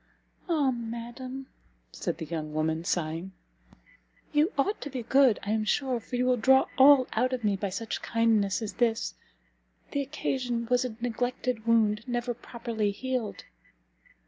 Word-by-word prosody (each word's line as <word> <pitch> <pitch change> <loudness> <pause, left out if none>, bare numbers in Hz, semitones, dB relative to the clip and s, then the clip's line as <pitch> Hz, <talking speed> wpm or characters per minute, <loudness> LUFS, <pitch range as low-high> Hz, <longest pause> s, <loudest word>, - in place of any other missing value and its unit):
"Ah 295 -6 +3
madam!" 240 +3 -6 0.5
said - - -3
the 165 - -5
young 155 -1 -5
woman, 160 +1 0
sighing, 170 +2 -2 1.0
"you 300 +6 +3
ought 400 +10 0
to 290 - -5
be 255 -3 -4
good, 265 -2 +5
I 205 - -2
am 220 0 +1
sure, 255 +2 0
for 230 - -7
you 250 +1 +1
will 250 0 +3
draw 265 +4 +5
all 270 -1 +8
out 255 +1 +1
of 250 -2 -3
me 205 -2 +2
by 195 +1 -2
such 215 +4 -4
kindness 225 -3 +2
as 210 - -4
this! 230 -2 0 0.8
the 285 - 0
occasion 255 -4 -2
was 250 0 +4
a 235 -4 -5
neglected 245 -1 -2
wound, 220 -1 +3
never 240 0 -1
properly 230 -3 -3
healed." 250 +1 -3
235 Hz, 155 wpm, -28 LUFS, 215-255 Hz, 1.0 s, all